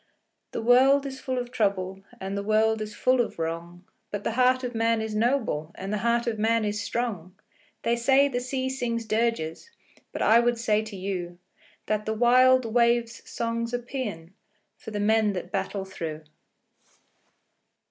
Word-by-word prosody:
The - - -5
world 265 +4 +5
is 265 -1 -6
full 260 -1 -3
of 245 -1 -4
trouble, 195 -4 -1 0.2
And 195 +1 -4
the 200 - -2
world 215 +1 +2
is 215 0 -6
full 255 +2 +3
of 235 - -4
wrong, 170 +2 -5 0.3
But 205 0 -5
the - - -1
heart 255 +2 +3
of 250 -1 -3
man 230 0 +1
is 220 -1 -3
noble, 220 - 0
And 195 +2 -5
the 210 - 0
heart 235 +1 +1
of 225 -3 -2
man 225 0 +2
is 210 0 -2
strong! 205 -5 -3 0.5
They 235 - +2
say 270 +4 +4
the 245 -3 -2
sea 260 +1 -2
sings 240 -3 -2
dirges, 220 - -1 0.4
But - - -3
I 225 +2 +6
would 240 0 +2
say 215 -2 +1
to 215 -2 -8
you 185 -2 -4 0.5
That 215 0 -1
the 220 - 0
wild 255 +2 +5
wave's 235 0 +1
song's 230 +1 -2
a - - +1
paean 215 -10 -6 0.4
For - - -10
the 210 -1 -4
men 215 0 +3
that 180 -1 -6
battle 195 0 -2
through. 160 -5 -6
225 Hz, 175 wpm, -26 LUFS, 200-245 Hz, 0.5 s, I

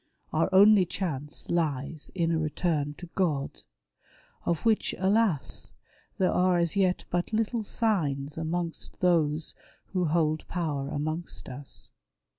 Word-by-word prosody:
Our 160 +3 +2
only 200 +1 +7
chance 155 -5 -4
lies 155 -3 -1
in 170 -2 +1
a 165 - +1
return 155 -1 -1
to 175 - -9
God; 150 -7 -1 0.9
of 170 +3 0
which, 225 -2 +2
alas, 195 -4 +1 0.4
there 185 - +3
are 180 0 +3
as 170 0 +1
yet 185 -2 +2
but 175 +3 -1
little 225 +1 0
signs 150 - 0
amongst 165 +1 -3
those 160 -3 +2 0.4
who 180 -2 +1
hold 155 -1 +1
power 150 -6 -2
amongst 155 +3 -3
us. 135 +2 -7
170 Hz, 125 wpm, -28 LUFS, 150-185 Hz, 0.9 s, only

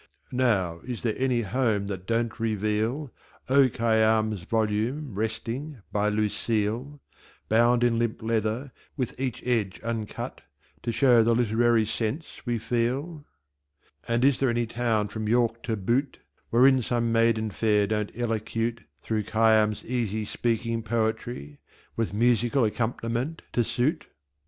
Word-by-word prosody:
Now, 100 -10 +1
is 120 +2 -6
there 115 -3 +1
any 130 -2 +1
Home 110 -2 0
that 95 -2 -6
Don't 115 0 -1
reveal 110 +5 -1 0.4
O. 135 0 +5
Khayyam's 110 -3 +2
volume 110 - -1
resting 115 +5 -4
by 105 0 +1
"Lucille," 110 +5 -1 0.5
Bound 120 +2 +4
in 115 -1 +2
Limp 115 -2 -1
Leather, 115 +4 -1 0.3
with 130 -4 -2
each 130 -3 -3
Edge 110 -7 0
uncut, 115 -2 -4 0.4
To 120 - -2
show 120 0 +5
the 115 +1 +3
Literary 115 -1 +3
Sense 115 +8 -3
we 120 -1 +1
feel? 130 +8 -2 0.8
And 120 +2 +2
is 140 -2 +3
there 135 - +2
any 120 0 +1
town 115 -2 0
from 110 -1 -4
York 115 0 +2
to 115 -1 -2
Butte 125 +8 0 0.3
Wherein 130 +2 +5
some 115 0 0
Maiden 115 -1 +2
fair 105 -1 +2
don't 105 0 -1
Elocute 115 0 -2 0.2
Through 110 -2 -1
Khayyam's 110 -1 +3
easy 110 -3 -1
speaking 115 +1 -1
poetry, 110 -9 -2 0.4
With 115 -1 -1
Musical 120 +4 +2
Accomp'niment 120 +6 -2
to 120 - +2
suit? 125 +8 -1
115 Hz, 130 wpm, -26 LUFS, 110-120 Hz, 0.8 s, O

